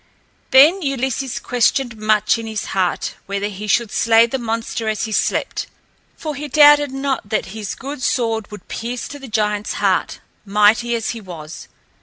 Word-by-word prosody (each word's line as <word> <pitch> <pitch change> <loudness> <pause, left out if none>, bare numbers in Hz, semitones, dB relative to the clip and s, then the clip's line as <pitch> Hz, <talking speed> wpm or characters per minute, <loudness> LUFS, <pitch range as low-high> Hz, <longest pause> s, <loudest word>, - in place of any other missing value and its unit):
Then 305 +9 +6
Ulysses 265 -2 -2
questioned 245 0 0
much 215 +1 +2
in 225 - -6
his 220 -2 -4
heart 185 -2 -1
whether 200 +1 -2
he 210 +1 -7
should 225 +1 +1
slay 225 0 +4
the 260 +3 -3
monster 230 -1 -3
as 215 -2 -2
he 220 - -3
slept, - - -1 0.5
for 305 -2 -4
he 295 +1 -6
doubted 290 0 +6
not 270 -5 -3
that 215 - 0
his 215 -2 -5
good 280 0 -7
sword 225 -4 0
would 210 - -11
pierce 240 +2 -5
to 285 - -8
the 270 - -10
giant's 210 -1 -1
heart, - - 0 0.2
mighty 210 +4 +3
as 225 -1 -2
he 230 - -7
was. 165 -5 -9
230 Hz, 170 wpm, -19 LUFS, 210-265 Hz, 0.5 s, Then